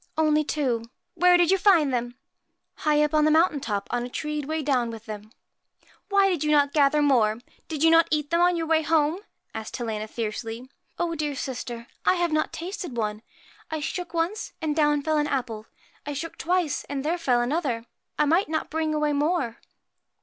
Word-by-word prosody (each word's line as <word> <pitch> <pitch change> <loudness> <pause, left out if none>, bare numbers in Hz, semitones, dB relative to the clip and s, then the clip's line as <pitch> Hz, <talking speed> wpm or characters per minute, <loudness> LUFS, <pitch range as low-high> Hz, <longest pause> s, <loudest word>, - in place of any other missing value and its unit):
' - - -45
Only 305 -1 +3
two.' 255 -7 -1 0.3
'Where 360 0 +5
did 350 0 +3
you 385 - +3
find 330 -10 +4
them?' 245 0 -2 0.3
' - - -52
High 300 0 +4
up, 300 - 0
on 305 -1 +4
the 305 - +4
mountain 315 -1 +3
top, 205 -5 -3
on 245 0 0
a 245 - -5
tree 300 +3 -3
weighed 310 +1 -3
down 250 -5 +1
with 225 -1 -9
them.' 215 0 -8 0.4
' - - -32
Why 400 -1 +4
did 350 -6 0
you 300 - 0
not 285 -2 +3
gather 295 0 +4
more? 225 -7 +3 0.3
Did 310 -2 -3
you 325 - +6
not 330 0 +6
eat 300 -1 -1
them 335 +1 +3
on 355 0 +4
your 330 -1 -1
way 320 0 +3
home? 315 +2 +2 0.2
' - - -47
asked 220 -1 -6
Helena, 220 -3 -3
fiercely. 225 +2 -5 0.2
' - - -44
Oh, 345 -1 -1
dear 300 -2 -2
sister, 240 -3 -5 0.2
I - - +4
have 345 -2 0
not 310 0 0
tasted 345 - -6
one! 210 -1 -2 0.5
I 315 - -3
shook 345 +4 -4
once, 340 +5 -2
and 310 -3 -1
down 295 -2 +2
fell 310 0 +1
an 295 - +1
apple; 230 -6 -3 0.4
I 290 - -4
shook 325 +4 -5
twice, 350 -3 0
and 280 0 -4
there 340 +3 0
fell 250 -7 +2
another. 245 -3 -1 0.3
I 300 - +3
might 330 +4 +2
not 315 0 -2
bring 315 0 -1
away 300 -1 +1
more.' 285 -5 0
300 Hz, 215 wpm, -25 LUFS, 245-325 Hz, 0.5 s, you